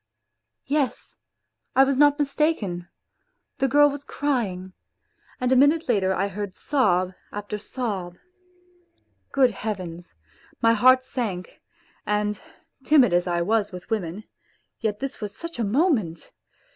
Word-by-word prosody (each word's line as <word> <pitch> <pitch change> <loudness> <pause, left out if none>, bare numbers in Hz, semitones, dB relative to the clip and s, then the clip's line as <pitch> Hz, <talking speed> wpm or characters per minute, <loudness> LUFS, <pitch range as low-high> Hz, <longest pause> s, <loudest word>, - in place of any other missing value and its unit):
Yes! 280 -2 -2 0.6
I 270 - +7
was 270 0 +1
not 290 +1 +5
mistaken, 280 - -1 0.7
the 270 - +2
girl 290 +3 +6
was 285 0 -4
crying, 205 -12 -2 0.7
and 250 -1 0
a - - +5
minute 290 +5 +4
later 195 -6 +2
I 190 +1 0
heard 200 -1 -6
sob 185 -10 +1 0.2
after 205 0 -5
sob. 200 -7 -4 1.1
Good 260 -3 +4
Heavens! 185 -5 -6 0.4
My 230 0 +4
heart 255 +3 +5
sank. 220 -9 -5 0.4
And 210 -1 -1 0.4
timid 265 - +5
as 175 +1 +2
I 175 -1 0
was 210 +2 +1
with 180 +4 -10
women, 200 -2 -2 0.6
yet 215 -1 -2
this 275 -2 -5
was 205 0 -6
such 335 -5 -7
a - - +1
moment 220 - 0
220 Hz, 130 wpm, -24 LUFS, 190-270 Hz, 1.1 s, I